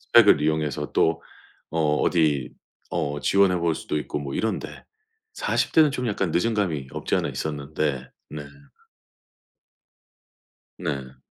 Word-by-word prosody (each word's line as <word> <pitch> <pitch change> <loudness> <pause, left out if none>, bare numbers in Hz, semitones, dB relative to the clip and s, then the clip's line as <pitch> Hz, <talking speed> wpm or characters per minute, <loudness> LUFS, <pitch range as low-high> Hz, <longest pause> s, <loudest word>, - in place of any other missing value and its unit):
스펙을 - - +6
이용해서 75 -1 -1
또 80 0 +2 0.5
어 80 -2 +2
어디 75 -7 +2 0.4
어 75 0 -2
지원해 95 +2 +4
볼 85 -2 +1
수도 - - -3
있고 75 0 -3
뭐 70 -1 -5
이런데 110 - -3 0.5
40 - - 0
대는 155 -2 +6
좀 125 -3 -2
약간 95 -5 -1
늦은 115 +7 +2
감이 80 -10 -1
없지 - - -2
않아 - - 0
있었는데 75 -3 -3 0.2
네. 75 -1 -6 2.4
네. 70 -6 -4
75 Hz, 230 characters per minute, -25 LUFS, 70-90 Hz, 2.4 s, 스펙을